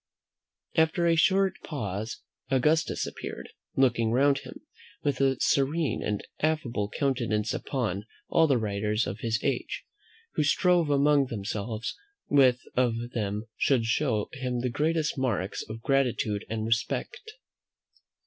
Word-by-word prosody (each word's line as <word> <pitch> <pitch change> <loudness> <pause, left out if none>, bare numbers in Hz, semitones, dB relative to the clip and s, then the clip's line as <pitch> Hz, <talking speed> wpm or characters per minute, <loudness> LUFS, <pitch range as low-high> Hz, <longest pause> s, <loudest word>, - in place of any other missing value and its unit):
After 160 +2 +3
a 165 -1 +4
short 190 +3 +3
pause 110 - -4 0.3
Augustus 150 +5 +2
appeared, - - -7 0.3
looking 120 -4 +3
round 135 +3 +4
him, - - -11 0.4
with 140 -1 0
a 135 -2 +2
serene 145 +2 +1
and 105 -1 -2
affable 125 -10 0
countenance, 115 -5 0
upon 110 -6 -2 0.2
all 165 - +4
the 135 -4 +3
writers 105 0 0
of 100 - -5
his 115 0 0
age, - - -2 0.5
who 155 - +1
strove 175 +2 +3
among 145 -1 +4
themselves 110 0 -4 0.3
which 135 -3 +6 0.2
of 125 -2 +2 0.2
them 105 -1 -2
should 125 -5 +2
show 115 -2 +1
him 125 -2 -2
the 125 - 0
greatest 155 +1 0
marks 105 -7 -1
of 115 +1 -7
gratitude 125 -7 +1
and 110 -1 -2
respect. 435 - -2
125 Hz, 130 wpm, -28 LUFS, 110-145 Hz, 0.5 s, which